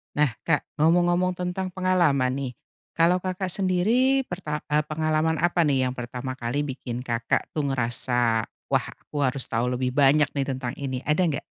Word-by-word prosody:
Nah 150 -3 +3 0.2
Kak 155 -4 +2 0.2
ngomong-ngomong 175 +3 +3
tentang 180 +1 -3
pengalaman 175 -9 +2
nih, 135 -3 -3 0.4
kalau 170 +2 +4
Kakak 185 0 -3
sendiri 215 +9 +2
perta 165 - -5
eee, 150 +1 +3
pengalaman 155 +1 +1
apa 175 -1 +3
nih 130 -3 +2
yang - - -7
pertama 125 +2 -5
kali 120 +5 -1
bikin 130 -3 -5
Kakak 115 -2 -1
tuh 150 -2 -2
ngerasa, 120 -3 +1 0.2
"Wah - - +2
aku 145 -2 -3
harus 130 0 -1
tahu 120 +2 0
lebih 125 0 -1
banyak 145 +2 +4
nih 140 -2 -2
tentang 130 -2 -3
ini." 130 -2 -3
Ada 155 +5 +2
nggak? 150 -4 -2
150 Hz, 165 wpm, -25 LUFS, 130-175 Hz, 0.4 s, kalau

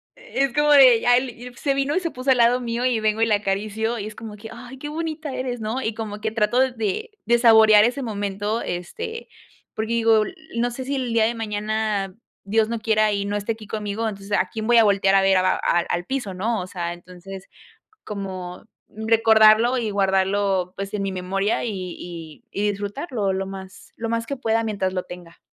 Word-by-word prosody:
es 275 - -2
como 295 +1 +3
de 260 -5 +8
ya 245 - +4
al 250 +1 +2
ip 245 +1 -11
se 275 +2 0
vino 275 +2 0
y - - +3
se 335 -3 -3
puso 255 +2 0
al 255 - +4
lado 240 +1 +4
mío 240 0 -2
y 245 -3 +2
vengo 215 0 0
y - - +5
la 215 -2 +3
acaricio 215 +3 -2
y 205 - -4
es 215 - -9
como 220 -2 -8
que: 220 +2 -10
"Ay, 245 +3 -10
qué 295 +3 -6
bonita 315 -2 -4
eres", 250 -2 -4
¿no?, 225 +5 -2
y 220 - -2
como 210 -2 -6
que 220 - -1
trato 225 +2 +1
de 230 - -1
de 240 +1 +4
saborear 220 -3 +7
ese 250 +5 0
momento, 205 0 -2
este, 450 - -5 0.5
porque 220 +1 -2
digo, 225 -2 +4
l - - -7 0.2
no 240 +1 +1
sé 255 +2 -6
si 280 +1 -2
el 250 -3 -2
día 225 -1 +4
de 235 +1 -1
mañana, 210 -2 -2 0.3
Dios 215 +2 +1
no 230 -1 -2
quiera 215 -1 +2
y 200 -1 -1
no 205 0 -2
esté 205 +2 -1
aquí 215 -2 -13
conmigo, 210 +1 -3
entonces, 200 -1 -7
¿a - - 0
quién 220 -1 -4
voy 240 - +5
a 230 - +7
voltear 195 -2 +3
a 195 - +5
ver? 195 0 +4
a 185 0 +2
al 175 0 +1
al 175 0 -1
piso, 245 -5 -3
¿no?, 215 +3 -1
o 180 - -6
sea, 175 -2 -4
entonces 180 +2 -11 0.6
como 185 -3 -6 0.3
recordarlo 220 +2 +4
y 225 -3 -2
guardarlo, 195 -1 +1
pues, 195 0 -5
en 205 - -1
mi 195 -1 -2
memoria 195 +3 -1
y 235 - -2 0.3
y 165 -3 -9
y 205 +1 -1
disfrutarlo 205 - -3
lo 190 0 -2
más 190 -1 -10
lo 230 - -4
más 230 0 -1
que 280 - -4
pueda 225 -2 0
mientras 200 -4 -1
lo 180 - -2
tenga. 175 -1 -11
220 Hz, 220 wpm, -23 LUFS, 195-240 Hz, 0.6 s, de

